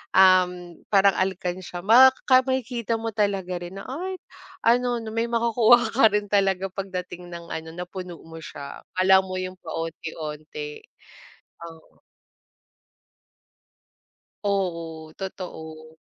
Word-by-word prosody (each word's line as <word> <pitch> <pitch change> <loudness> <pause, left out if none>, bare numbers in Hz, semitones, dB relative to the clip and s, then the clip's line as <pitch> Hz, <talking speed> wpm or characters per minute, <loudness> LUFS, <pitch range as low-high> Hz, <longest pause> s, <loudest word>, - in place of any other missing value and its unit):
um, 180 -2 +4
parang 200 -1 +5
alkansiya, 180 -1 -3
maka 255 +4 +6
makikita 245 -3 -1
mo 225 0 -3
talaga 195 -4 -1
rin 175 +2 -8
na, 195 - -7
ay 365 +8 -4 0.5
ano, 245 +1 +3
na 220 - -6
may 230 +1 0
makukuha 235 0 +4
ka 230 -1 +6
rin 205 -1 -2
talaga 195 -1 +2
pagdating 180 -2 -6
ng 170 -1 -9
ano, 160 0 -5
napuno 180 0 -7
mo 165 0 -10
siya, 140 -3 -9 0.2
akala 190 +1 +6
mo 190 -1 -4
'yong 185 0 -5
paonti-onti. 155 -2 -6 0.9
Oo. 160 -1 -21 2.4
Oo, 165 -5 -2
totoo. 160 -4 -8
185 Hz, 110 wpm, -25 LUFS, 170-220 Hz, 2.4 s, maka